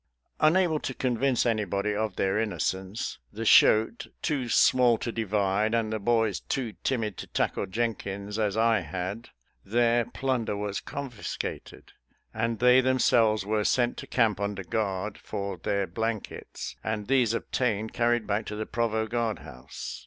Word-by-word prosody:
Unable 160 0 +3
to 130 - -4
convince 130 0 +1
anybody 105 -2 0
of 105 -2 -2
their 95 +2 +1
innocence, 100 -2 -2
the 115 +2 -5
shoat, 110 - +5 0.2
too 135 -6 -1
small 125 -2 +5
to 120 - -4
divide, 105 0 0
and 110 -1 0
the 110 - -1
boys 110 -1 +1
too 125 -6 -3
timid 110 -7 -1
to - - -7
tackle - - -1
Jenkins 105 -1 -3
as 105 -1 0
I 115 -1 +4
had, 95 +7 -5 0.3
their 120 +2 +2
plunder 125 -6 -2
was 105 -1 -2
confiscated, 135 -6 -6 0.4
and 115 +1 -1
they 125 +3 +6
themselves 120 -5 +3
were 105 0 0
sent 120 +2 +2
to - - -7
camp 115 -5 +2
under 100 -1 -3
guard, 100 +1 -2
for 100 -3 -4
their 100 +3 -1
blankets, 110 +4 -4
and 110 -1 -2
these 125 -3 +2
obtained, 110 -3 -1
carried 120 -1 +1
back 105 +1 -1
to 105 - -4
the 110 +1 -3
provost 110 -1 -1
guard 115 -3 0
house. 65 +3 -8
110 Hz, 150 wpm, -27 LUFS, 100-120 Hz, 0.4 s, they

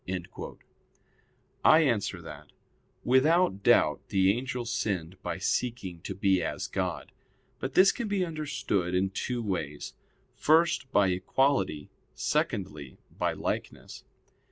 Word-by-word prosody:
I 155 - +7
answer 105 - 0
that, 75 -2 -10 0.6
Without 130 - +3
doubt - - +4
the 95 0 +3
angel 125 0 -4
sinned 95 -7 -3
by - - -3
seeking 95 -2 -2
to 95 - -6
be 95 -2 +2
as 80 - -3
God. - - -3 0.5
But 130 0 -5
this 190 +1 +7
can 235 -3 -4
be 200 -3 0
understood 145 - -2
in 95 +1 +1
two 120 +4 -3
ways: 80 -8 -4 0.4
first, 160 -3 +2
by 100 -6 +4
equality; 95 - 0 0.2
secondly, 75 -9 -2 0.2
by - - 0
likeness. - - -5
105 Hz, 115 wpm, -28 LUFS, 90-135 Hz, 0.6 s, I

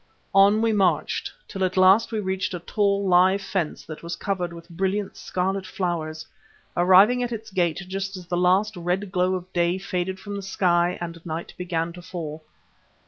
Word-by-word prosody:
On 200 +3 +5
we 225 -1 +2
marched 195 -3 +1 0.2
till 195 -3 -3
at 185 0 -1
last 190 +5 +5
we 220 - -1
reached 190 -2 -2
a - - -4
tall, 200 +2 0
live 185 +2 +5
fence 185 -5 -3
that 155 -1 -8
was 170 0 -5
covered 180 -3 -2
with 170 0 -11
brilliant 190 +3 -2
scarlet 190 +1 -2
flowers, 160 -4 -3 0.5
arriving 190 +8 +6
at 245 -1 -2
its 220 -1 -6
gate 180 -1 0
just 195 +1 -4
as 180 - -10
the 175 - -2
last 185 +4 +2
red 180 +3 -2
glow 185 0 +1
of 185 0 -7
day 175 +1 +2
faded 190 0 -3
from 205 +1 -6
the 200 - -4
sky 180 -2 +1
and 170 -1 -6
night 165 0 -5
began 170 -2 -2
to 175 - -10
fall. 160 -4 -6
185 Hz, 185 wpm, -24 LUFS, 175-195 Hz, 0.5 s, arriving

